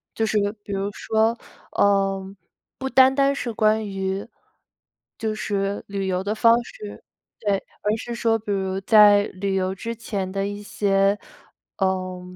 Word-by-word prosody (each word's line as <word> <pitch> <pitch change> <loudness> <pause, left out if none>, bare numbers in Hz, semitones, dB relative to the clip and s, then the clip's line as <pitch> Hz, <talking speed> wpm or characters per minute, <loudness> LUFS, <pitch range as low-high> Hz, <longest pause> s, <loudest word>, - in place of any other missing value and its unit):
就 225 - +1
是 215 - 0 0.3
比 - - -8
如 195 0 -1
说， 220 +3 0 0.4
呃， 195 -1 +1 0.4
不 265 - -3
单 265 0 +6
单 275 0 +3
是 245 -4 -4
关 215 0 +2
于 195 +1 -3 0.9
就 220 -1 -2
是 200 -1 -2
旅 195 -1 -3
游 185 0 -1
的 205 +2 -1
方 230 +2 +4
式， 210 -3 -10 0.4
对， 205 -3 +1 0.3
而 210 +1 +2
是 235 +1 -6
说 225 -1 +2
比 210 -1 -5
如 190 -1 -1
在 205 0 +7
旅 195 0 -3
游 190 0 -1
之 230 +4 -5
前 200 -4 -4
的 195 +1 -2
一 205 0 -6
些， 200 -1 +1 0.6
呃， 185 -1 -1
205 Hz, 165 characters per minute, -23 LUFS, 195-220 Hz, 0.9 s, 在